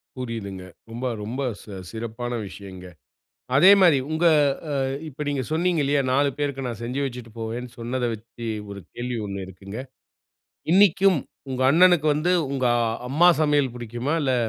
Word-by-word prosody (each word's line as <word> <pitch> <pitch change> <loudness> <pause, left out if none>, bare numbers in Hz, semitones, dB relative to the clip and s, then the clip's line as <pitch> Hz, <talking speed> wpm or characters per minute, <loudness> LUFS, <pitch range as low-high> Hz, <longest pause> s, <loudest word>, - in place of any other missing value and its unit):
புரியுதுங்க. 110 -7 -5 0.3
ரொம்ப 120 +3 -5 0.2
ரொம்ப 120 +6 -4 0.2
ச - - -17 0.3
சிறப்பான 115 +2 -5 0.2
விஷயங்க. 95 -2 -10 0.7
அதே 180 +8 +8
மாரி 170 -6 +6
உங்க 160 +2 0 0.5
அ 135 - +1 0.2
இப்ப 150 +1 -10
நீங்க 140 -2 -1
சொன்னீங்க 170 0 +1
இல்லையா, 140 0 +2
4 140 +2 +3
பேருக்கு 140 -2 -2
நா - - -2
செஞ்சு 125 +4 -3
வச்சுட்டு 125 -3 -7
போவேன்னு 115 +2 -4
சொன்னத 120 +2 -2
வச்சு, 115 +2 -9 0.2
1 100 0 -7
கேள்வி 120 0 -4
ஒண்ணு 100 -1 -5
இருக்குங்க. 95 +3 -9 0.9
இன்னைக்கும் 195 -2 +5 0.3
உங்க 130 0 -1
அண்ணனுக்கு 175 0 +5
வந்து 155 +4 0 0.2
உங்க 130 -2 0 0.4
அம்மா 165 +6 +5
சமையல் 145 -4 +2
புடிக்குமா, 120 +5 -3
இல்ல 130 -2 +1
130 Hz, 145 wpm, -24 LUFS, 115-150 Hz, 0.9 s, அதே